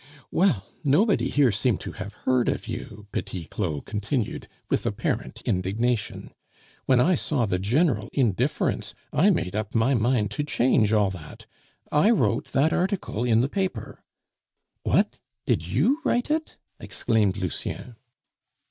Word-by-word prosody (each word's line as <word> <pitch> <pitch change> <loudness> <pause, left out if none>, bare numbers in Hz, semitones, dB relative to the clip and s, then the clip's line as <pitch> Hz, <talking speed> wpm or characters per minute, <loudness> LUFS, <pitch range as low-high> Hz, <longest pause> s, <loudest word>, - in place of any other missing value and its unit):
"Well, 170 - +2 0.2
nobody 175 - +3
here 140 -5 +4
seemed 105 +1 +1
to - - -5
have 100 +3 -7
heard 130 -2 +3
of - - -3
you!" 115 -2 -7
Petit 95 -3 -4
Claud 80 -3 -3
continued, 105 +3 -2 0.2
with - - 0
apparent - - -3
indignation. 105 +5 -1 0.6
"When 130 -2 +5
I 175 +9 +4
saw 145 -7 0
the 90 -3 -1
general 115 - +1
indifference, 115 -10 0 0.2
I - - +4
made 90 +2 0
up 105 +1 -3
my 115 +4 +3
mind 115 -3 +1
to 145 - -2
change 125 -7 +2
all 105 -3 +3
that. 80 -5 -10 0.5
I 150 +8 +4
wrote 230 - +2
that 150 +4 +1
article 185 - -1
in 115 -2 +3
the 130 - +1
paper 190 +5 -3 0.4
" - - -56
"What? - - +1 0.3
did - - 0
you 285 +4 +2
write 245 0 +1
it?" 315 +1 -2 0.2
exclaimed 105 -4 0
Lucien. 100 +6 -4
115 Hz, 145 wpm, -25 LUFS, 100-145 Hz, 0.6 s, When